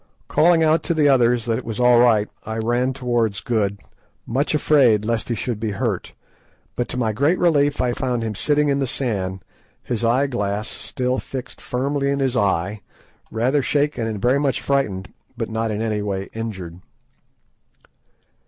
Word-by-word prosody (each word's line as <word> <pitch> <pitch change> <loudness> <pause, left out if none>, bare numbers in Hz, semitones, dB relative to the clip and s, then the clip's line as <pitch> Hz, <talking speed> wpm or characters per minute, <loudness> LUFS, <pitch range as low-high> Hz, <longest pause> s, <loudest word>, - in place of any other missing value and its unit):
Calling 165 0 +4
out 160 0 +3
to 170 - -1
the 150 -2 +4
others 120 -4 +3
that 115 0 0
it - - -9
was 115 -1 -5
all 125 -1 +5
right, 110 -4 +4 0.2
I 110 +1 -5
ran 120 +3 +1
towards 120 -5 -1
Good, 110 -5 -1 0.5
much 140 +5 0
afraid 125 -9 +4
lest 115 +1 -1
he 120 - 0
should 115 +1 -3
be 110 -2 -2
hurt, 95 - -2 0.6
but 120 - -1
to - - -5
my 115 -3 0
great 145 - +2
relief 145 -4 +2
I 125 -1 +1
found 125 -2 -2
him 110 -1 -2
sitting 150 +7 +1
in 140 0 +1
the 135 - 0
sand, 95 -8 -2 0.4
his 120 -2 -3
eye 120 +4 +3
glass 105 -5 -2
still 125 +2 -3
fixed 130 -1 -8
firmly 140 +2 -1
in 140 - +1
his 135 -2 0
eye, 100 0 0 0.5
rather 130 +6 +1
shaken 145 -3 0
and 110 -2 -3
very 125 +7 +2
much 140 -2 0
frightened, 105 -10 -1 0.2
but - - -3
not 110 0 -1
in 105 +1 -2
any 110 -2 -1
way 100 -1 -3
injured. 95 -7 -6
120 Hz, 175 wpm, -21 LUFS, 110-135 Hz, 0.6 s, all